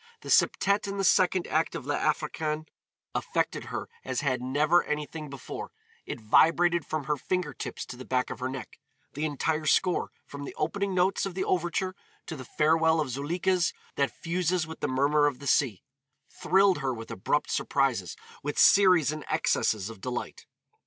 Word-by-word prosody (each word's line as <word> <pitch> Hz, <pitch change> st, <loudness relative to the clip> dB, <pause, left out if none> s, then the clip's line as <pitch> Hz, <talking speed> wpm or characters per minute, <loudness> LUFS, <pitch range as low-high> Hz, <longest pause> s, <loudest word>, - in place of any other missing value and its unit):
The -, -, -9 dB
septette 200 Hz, +1 st, +3 dB
in 200 Hz, 0 st, -4 dB
the 195 Hz, -, 0 dB
second 185 Hz, -1 st, +3 dB
act 160 Hz, +1 st, 0 dB
of 135 Hz, -, -5 dB
"L'Africaine" 155 Hz, +1 st, -1 dB, 0.5 s
affected -, -, -1 dB
her -, -, -5 dB, 0.2 s
as 130 Hz, 0 st, -2 dB
had 130 Hz, -4 st, 0 dB
never 150 Hz, +7 st, +3 dB
anything 150 Hz, 0 st, -4 dB
before; 140 Hz, -2 st, -7 dB, 0.4 s
it -, -, -5 dB
vibrated 165 Hz, +9 st, +3 dB
from 155 Hz, -2 st, -2 dB
her 150 Hz, +1 st, -1 dB
fingertips 165 Hz, -2 st, -3 dB
to 125 Hz, -, -8 dB
the 130 Hz, -, -8 dB
back 125 Hz, 0 st, -1 dB
of -, -, -6 dB
her 130 Hz, +1 st, -2 dB
neck; 130 Hz, -2 st, -8 dB, 0.3 s
the 150 Hz, +3 st, -2 dB
entire 155 Hz, +1 st, -1 dB
score, 180 Hz, +4 st, +2 dB, 0.2 s
from 140 Hz, 0 st, -8 dB
the 140 Hz, -, -7 dB
opening 195 Hz, +5 st, -1 dB
notes 185 Hz, +2 st, +2 dB
of 185 Hz, -, -8 dB
the 190 Hz, -, -1 dB
overture 185 Hz, +1 st, 0 dB, 0.3 s
to 160 Hz, -, -6 dB
the 130 Hz, -3 st, -8 dB
farewell 160 Hz, +4 st, +3 dB
of 150 Hz, -4 st, -1 dB
Zuleika's 170 Hz, +6 st, 0 dB, 0.2 s
that 140 Hz, -1 st, +1 dB
fuses 175 Hz, 0 st, -1 dB
with 160 Hz, 0 st, -9 dB
the -, -, -1 dB
murmur 145 Hz, +3 st, +3 dB
of 140 Hz, -3 st, -2 dB
the 140 Hz, -, -11 dB
sea, 125 Hz, -9 st, +2 dB, 0.5 s
thrilled 190 Hz, -1 st, +3 dB
her 135 Hz, -3 st, -1 dB
with 115 Hz, 0 st, -8 dB
abrupt 145 Hz, +10 st, -1 dB
surprises, 120 Hz, -, 0 dB, 0.3 s
with 145 Hz, +1 st, -4 dB
series 180 Hz, -7 st, +6 dB
and 155 Hz, -1 st, -6 dB
excesses 105 Hz, -3 st, +1 dB
of 110 Hz, -, -13 dB
delight. 125 Hz, +2 st, -5 dB
150 Hz, 175 wpm, -28 LUFS, 135-175 Hz, 0.5 s, series